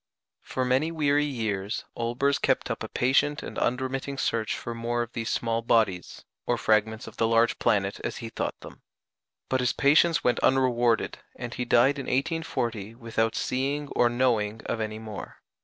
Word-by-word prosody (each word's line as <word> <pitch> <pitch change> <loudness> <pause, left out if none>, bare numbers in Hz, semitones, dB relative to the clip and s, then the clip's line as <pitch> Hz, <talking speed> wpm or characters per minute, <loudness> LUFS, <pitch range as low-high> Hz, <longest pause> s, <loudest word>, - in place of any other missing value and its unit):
For 130 - -2
many 130 +6 +2
weary 150 -2 +2
years 110 -7 -3
Olbers 120 +4 0
kept - - +1
up - - -4
a - - -3
patient 135 +4 +1
and - - -5
unremitting 130 +2 -1
search 115 -5 -1
for 120 - -5
more 120 +1 -1
of 120 - -10
these 115 0 -3
small 115 0 0
bodies, 110 -6 0 0.2
or - - +2
fragments 110 +1 +1
of - - -11
the 115 - +2
large 115 +1 +3
planet 100 -1 +1
as - - -3
he 115 - -6
thought - - -4
them; - - -12 0.7
but 130 - +1
his 125 -1 +1
patience 155 +3 +4
went 120 -1 +2
unrewarded, 120 -3 +2 0.2
and 120 -1 -6
he 125 - -3
died 130 +4 +4
in 135 - -5
1840 120 - -2
without 115 -1 -1
seeing 140 +3 -1
or 120 - +3
knowing 115 -3 +1
of 115 - -2
any 110 0 -3
more. 110 -2 -8
120 Hz, 175 wpm, -27 LUFS, 115-135 Hz, 0.7 s, patience